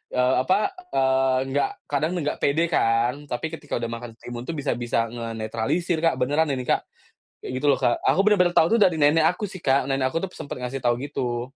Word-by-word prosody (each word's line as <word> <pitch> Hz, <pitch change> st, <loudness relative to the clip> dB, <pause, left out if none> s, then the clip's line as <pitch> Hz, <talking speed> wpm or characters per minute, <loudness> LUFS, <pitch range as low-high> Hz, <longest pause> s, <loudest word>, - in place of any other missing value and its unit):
eee, 125 Hz, +1 st, +3 dB
apa, 205 Hz, -, +1 dB, 0.2 s
eee, 130 Hz, -1 st, +3 dB
enggak 145 Hz, -, +1 dB, 0.2 s
kadang 155 Hz, +4 st, 0 dB
enggak 150 Hz, -4 st, -2 dB
pede 165 Hz, +4 st, +1 dB
kan. 120 Hz, +5 st, +1 dB
Tapi 150 Hz, +6 st, -3 dB
ketika 155 Hz, -3 st, -5 dB
udah 115 Hz, -1 st, -3 dB
makan 115 Hz, 0 st, -6 dB
timun 120 Hz, +1 st, -8 dB
tuh 165 Hz, -, -3 dB
bisa 145 Hz, -1 st, -1 dB
bisa 115 Hz, -1 st, -1 dB
ngenetralisir 115 Hz, +9 st, -2 dB
Kak, 165 Hz, 0 st, +2 dB
beneran 145 Hz, +5 st, +1 dB
ini 130 Hz, -, -4 dB
Kak. -, -, 0 dB, 0.6 s
Kayak -, -, -5 dB
gitu 145 Hz, -, -1 dB
loh, 140 Hz, -, +5 dB
Kak. 120 Hz, -, +1 dB
Aku 195 Hz, -, +2 dB
bener-bener 180 Hz, -4 st, +3 dB
tahu 160 Hz, -, +6 dB
tuh -, -, 0 dB
dari 180 Hz, -5 st, +4 dB
nenek 155 Hz, +2 st, +4 dB
aku 180 Hz, +4 st, -3 dB
sih 185 Hz, -3 st, -6 dB
Kak. 135 Hz, -1 st, +2 dB
Nenek 135 Hz, -1 st, 0 dB
aku 165 Hz, +7 st, -2 dB
tuh 185 Hz, -, -5 dB
sempet 140 Hz, -, -7 dB
ngasih 125 Hz, +1 st, -4 dB
tahu 120 Hz, -1 st, +2 dB
gitu. 125 Hz, -3 st, -3 dB
135 Hz, 215 wpm, -24 LUFS, 120-160 Hz, 0.6 s, tahu